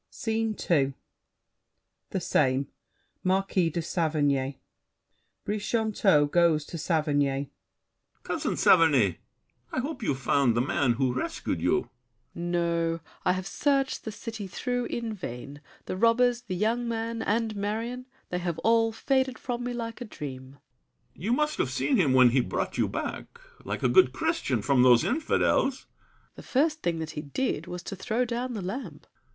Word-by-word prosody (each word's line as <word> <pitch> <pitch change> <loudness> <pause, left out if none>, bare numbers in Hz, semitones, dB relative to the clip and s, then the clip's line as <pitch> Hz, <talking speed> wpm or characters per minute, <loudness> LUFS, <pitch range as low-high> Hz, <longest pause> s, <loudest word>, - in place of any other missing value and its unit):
SCENE 225 -1 -2 0.2
II 140 -4 +3 1.2
The - - -2
same. 130 +1 +1 0.5
Marquis 185 -2 +2
de 165 +1 -3
Saverny 145 -5 0 0.9
BRICHANTEAU 210 -6 +2
(going 170 -2 +4
to 155 +3 -7
Saverny). 145 -4 0 0.7
Cousin - - -2
Saverny, 135 - +5 0.5
I - - -1
hope 275 +1 -4
you've 145 -11 0
found 130 -2 +2
the - - +4
man 130 -1 +1
who 125 +1 0
rescued 130 - -3
you. - - +1 0.5
SAVERNY. 175 0 -4
No; 170 -1 0 0.2
I 180 - +3
have 185 0 -4
searched 275 +5 0
the 220 - -5
city 215 -1 -6
through 245 +5 -2
in 230 -2 -3
vain. 140 - -7 0.2
The - - -3
robbers, 235 +3 +3
the 205 -7 -5
young 230 +5 0
man, 230 0 -2
and 220 0 0
Marion— 225 +5 -3 0.2
They 180 - -2
have 175 -2 -2
all 225 0 +4
faded 260 +2 0
from 245 -1 -4
me 245 - -2
like 230 0 -5
a - - -3
dream. 135 - -8 0.6
BRICHANTEAU. - - -14
You 230 - +2
must 300 +3 +1
have - - +1
seen 275 - +1
him 150 -9 +3
when 130 -1 +7
he 130 +2 +3
brought - - -3
you - - +3
back, 475 - -5 0.2
Like - - -4
a - - +5
good 370 - +5
Christian, 320 - -1
from 135 0 +3
those 125 -2 +6
infidels. 270 -1 +1
SAVERNY. - - -34
The - - -8
first 305 +4 +1
thing 170 -1 0
that 160 -1 -4
he 150 - -5
did 155 - -2
was 180 0 -6
to 195 - -6
throw 230 +6 -1
down 245 +1 -3
The 200 - -4
lamp. 190 - -6
190 Hz, 160 wpm, -27 LUFS, 145-235 Hz, 1.2 s, when